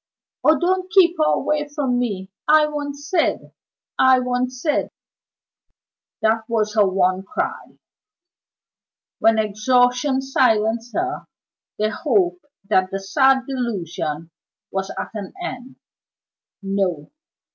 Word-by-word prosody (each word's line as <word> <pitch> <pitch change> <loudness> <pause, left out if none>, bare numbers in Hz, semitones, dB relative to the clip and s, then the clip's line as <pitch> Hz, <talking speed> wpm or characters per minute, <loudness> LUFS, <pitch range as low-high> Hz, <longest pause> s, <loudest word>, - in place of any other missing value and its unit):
"Oh, 310 +1 +5
don't 370 +1 0
keep 355 -2 +5
her 310 - +4
away 300 -1 0
from 270 -4 -1
me! 200 -5 -3 0.2
I 310 0 +6
want 290 -1 -4
Syd! 290 +4 -1 0.5
I 260 0 +6
want 250 0 -1
Syd!" 275 +4 -1 1.3
That 220 0 +2
was 215 -2 0
her 210 -2 +4
one 185 0 +1
cry. 195 - -5 1.4
When 225 0 +4
exhaustion 245 +5 +2
silenced 230 -3 +1
her, 370 +1 -2 0.5
they 215 0 +1
hoped 350 - 0 0.2
that 185 -2 +2
the 195 - -3
sad 265 +6 +3
delusion 175 - -4 0.4
was 195 0 -3
at - - -4
an 205 -3 -7
end. 260 -8 -7 0.9
No! 195 -6 -2
245 Hz, 115 wpm, -21 LUFS, 205-290 Hz, 1.4 s, I